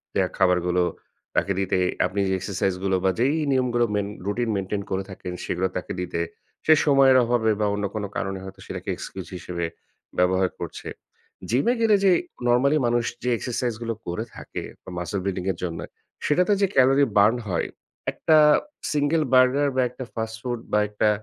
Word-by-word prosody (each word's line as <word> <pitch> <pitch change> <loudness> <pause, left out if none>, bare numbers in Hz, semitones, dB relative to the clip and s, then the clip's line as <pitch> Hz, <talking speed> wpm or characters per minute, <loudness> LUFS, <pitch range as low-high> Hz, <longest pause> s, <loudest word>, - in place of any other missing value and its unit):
দেয়া 95 -1 +2
খাবারগুলো 90 -1 +3 0.5
তাকে - - +1
দিতে। 95 -1 +1 0.3
আপনি 100 - -2
যে 95 - +1
এক্সারসাইজ 95 0 -1
গুলো 95 -1 +2
বা 95 - +4
যেই 135 +5 +3 0.2
নিয়মগুলো 125 -2 +2
মেইন 100 -1 0 0.2
রুটিন 115 +4 -1
মেইনটেইন 100 +1 -2
করে 95 0 0
থাকেন 90 -1 -7
সেগুলো 90 +2 0
তাকে 90 - -5
দিতে। 90 -2 -2 0.4
সে 155 - +7
সময়ের 135 -3 +6
অভাবে 115 -2 +2
বা 105 - +2
অন্য 100 0 -1
কোনো 105 -1 -2
কারণে 95 0 -2
হয়তো 95 - -10
সেটাকে - - -6
এক্সকিউজ 95 -4 -7
হিসেবে 85 -1 -4 0.5
ব্যবহার 95 +1 +3
করছে। - - -6 0.6
জিম 125 +4 +2
এ - - +3
গেলে 220 -2 +5
যে, 190 - +6 0.4
নরমালি 130 +5 +4
মানুষ 120 0 +1 0.2
যে 125 - 0
এক্সারসাইজ 120 0 -2
গুলো 115 -1 -2
করে 90 +6 -2
থাকে - - -6 0.2
বা - - -10
মাসল 90 +3 -3
বিল্ডিং 95 -2 -2
এর 90 - -7
জন্য। 85 -2 -3 0.5
সেটাতে 180 +7 +3
যে 200 - +4
ক্যালোরি 135 +1 +5
বার্ন 105 +4 +5
হয়, 85 - 0 0.4
একটা 155 - +3 0.5
সিঙ্গল 150 +2 +2
বার্গার 130 +3 +5
বা 130 - +3
একটা 125 +2 -8
ফাস্ট 110 0 -4
ফুড 120 -1 -3
বা 105 - +5
একটা 105 +1 +2
110 Hz, 175 wpm, -24 LUFS, 95-130 Hz, 0.6 s, সে